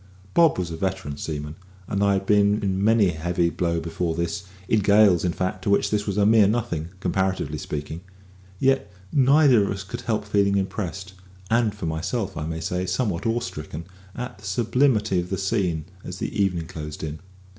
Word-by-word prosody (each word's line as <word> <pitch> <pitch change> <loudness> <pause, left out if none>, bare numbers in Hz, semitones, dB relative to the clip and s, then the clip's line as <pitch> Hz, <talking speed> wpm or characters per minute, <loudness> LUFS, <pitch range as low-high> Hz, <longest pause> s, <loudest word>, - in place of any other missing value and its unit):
Bob 165 -2 +5
was 90 -2 -2
a - - -4
veteran 95 -4 -3
seaman, 75 0 -5 0.3
and 100 0 0
I 100 0 +4
had 95 0 -1
been 105 +1 +3
in 95 0 0
many 110 -2 +4
a 80 -2 -5
heavy 85 +1 +1
blow 85 -1 0
before 80 0 -2
this 85 +2 -3 0.2
in 110 - +3
gales, 100 -3 +5
in 90 - +1
fact, 95 +2 -3
to 100 - -2
which 100 - +2
this 105 0 0
was 100 0 -2
a 100 - +4
mere 110 -1 +6
nothing, 105 -8 -1
comparatively 95 -6 -1
speaking; 75 +2 -5 0.6
yet 135 -4 +1 0.2
neither 135 -4 +5
of 100 - -1
us 100 0 -3
could 120 +5 -7
help 110 -3 -1
feeling 100 -1 +2
impressed 95 0 -3 0.4
and 115 -3 +2
for 105 - -5
myself 85 +7 -2
I 75 -1 -4
may 80 0 -4
say 90 +3 -2
somewhat 100 -5 -1
awe 115 +1 +1
stricken 80 -6 -6 0.3
at 120 -5 -6
the 105 - -13
sublimity 110 -1 +2
of 90 0 -4
the 95 - -1
scene 95 -6 -1 0.2
as 90 - -7
the - - -4
evening 90 -5 +1
closed 75 -4 -7
in. 80 0 -5
95 Hz, 195 wpm, -24 LUFS, 85-105 Hz, 0.6 s, mere